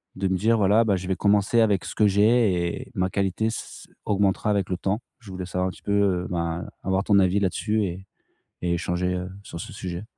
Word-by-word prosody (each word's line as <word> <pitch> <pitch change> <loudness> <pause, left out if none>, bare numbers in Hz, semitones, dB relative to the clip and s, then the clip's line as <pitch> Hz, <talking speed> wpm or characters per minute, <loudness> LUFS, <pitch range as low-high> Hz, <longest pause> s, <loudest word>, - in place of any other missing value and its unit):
de 95 0 -1
me 95 0 +1
dire: 115 +4 +2
«Voilà, 105 +3 +4
bah 100 -3 +2
je 90 0 -5
vais 95 - 0
commencer 105 +4 +3
avec 100 -4 +2
ce - - -5
que 105 - +4
j'ai 100 -4 +2
et - - -19
ma 95 0 0
qualité 100 +3 0
ç 110 - -3 0.3
ç - - -27 0.2
augmentera 100 0 +1
avec 100 -3 0
le 90 - 0
temps». 100 +5 -1 0.2
Je 115 -5 -14
voulais 90 -1 -5
savoir 90 +1 -1
un - - -3
petit - - -16
peu, 100 - -1
heu 95 -3 +2
ben, 85 -1 -2 0.2
avoir 95 +1 0
ton 100 -1 +4
avis 95 +1 +3
là-dessus 105 +3 0
et 95 +1 -5 0.6
et 85 - 0
échanger, 90 +1 -1
heu, 90 0 -3
sur 85 -4 -8
ce - - -7
sujet. 90 +2 -5
95 Hz, 235 wpm, -25 LUFS, 90-105 Hz, 0.6 s, Voilà